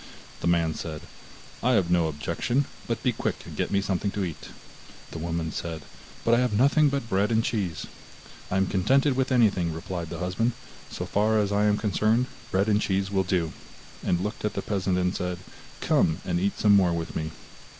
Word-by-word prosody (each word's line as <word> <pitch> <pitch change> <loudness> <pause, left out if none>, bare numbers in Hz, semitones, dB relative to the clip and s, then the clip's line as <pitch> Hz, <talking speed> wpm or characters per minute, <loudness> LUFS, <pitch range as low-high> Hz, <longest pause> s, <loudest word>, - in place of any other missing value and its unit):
The - - -2
man 85 -2 +2
said: 80 0 -6 0.6
'I 125 +2 +3
have 95 -6 +2
no 85 -2 +3
objection, 85 - -1 0.2
but 115 -2 -2
be 125 - +3
quick 110 - -2
and - - -9
get - - -1
me 100 0 +2
something 100 0 -1
to 100 - +1
eat.' 85 -4 -7 0.6
The 80 - -6
woman 85 -1 -2
said: 80 -2 -5 0.4
'But 115 - +4
I 120 - +5
have 125 -3 +1
nothing 140 +4 +5
but 140 -4 -2
bread 100 +1 +1
and 115 0 +3
cheese.' 95 - -2 0.6
'I 95 - 0
am 95 - +3
contented 130 +10 +2
with 130 0 0
anything,' 100 -9 +3
replied 85 +1 -5
the 85 - -5
husband, 90 +7 0 0.4
'so - - -5
far 110 +2 +2
as 105 -1 +1
I 105 +1 +2
am 105 0 +3
concerned, 110 +3 +2 0.2
bread 95 +2 +1
and 105 0 +3
cheese 95 0 0
will 95 -1 +2
do,' 90 -3 0 0.5
and 85 - +1
looked 105 +2 -4
at 105 - -1
the - - -2
peasant 95 -3 0
and 90 +1 +1
said: 90 0 -2 0.4
'Come 80 - +2
and 85 -1 0
eat 100 +2 0
some 105 -1 +5
more 90 -3 +4
with 85 0 -4
me. 80 0 -2
95 Hz, 200 wpm, -26 LUFS, 85-110 Hz, 0.6 s, I